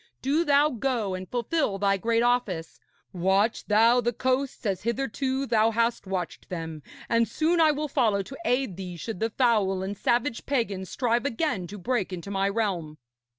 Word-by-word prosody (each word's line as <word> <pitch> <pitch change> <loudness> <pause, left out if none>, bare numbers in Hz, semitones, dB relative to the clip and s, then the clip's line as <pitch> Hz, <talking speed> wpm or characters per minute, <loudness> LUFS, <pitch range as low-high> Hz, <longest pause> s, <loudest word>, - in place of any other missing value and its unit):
Do 290 +5 +2
thou 290 -1 +4
go 240 -5 -1
and 185 0 -6
fulfil 245 -2 0
thy 195 0 +2
great 230 +3 +1
office. 230 -10 0 0.3
Watch 190 +5 +1
thou 230 +4 +5
the 240 0 0
coasts 255 +2 -1
as 195 -3 -1
hitherto 265 +3 -1
thou 225 -2 +3
hast 230 -2 0
watched 185 -3 -4
them; 165 -3 -5 0.3
and 230 0 +2
soon 330 - +1
I 315 - +6
will 300 0 0
follow 215 -7 +1
to 270 - -10
aid 250 - 0
thee, 180 -2 -6
should 220 +2 -5
the 225 - 0
foul 210 -6 +2
and 195 +2 -4
savage 240 +4 0
pagans 205 -9 -1
strive 240 +1 0
again 230 - -1
to 205 - -8
break 205 0 -1
into 185 +2 -6
my 195 0 +1
realm.' 190 -8 -2
225 Hz, 175 wpm, -26 LUFS, 195-255 Hz, 0.3 s, I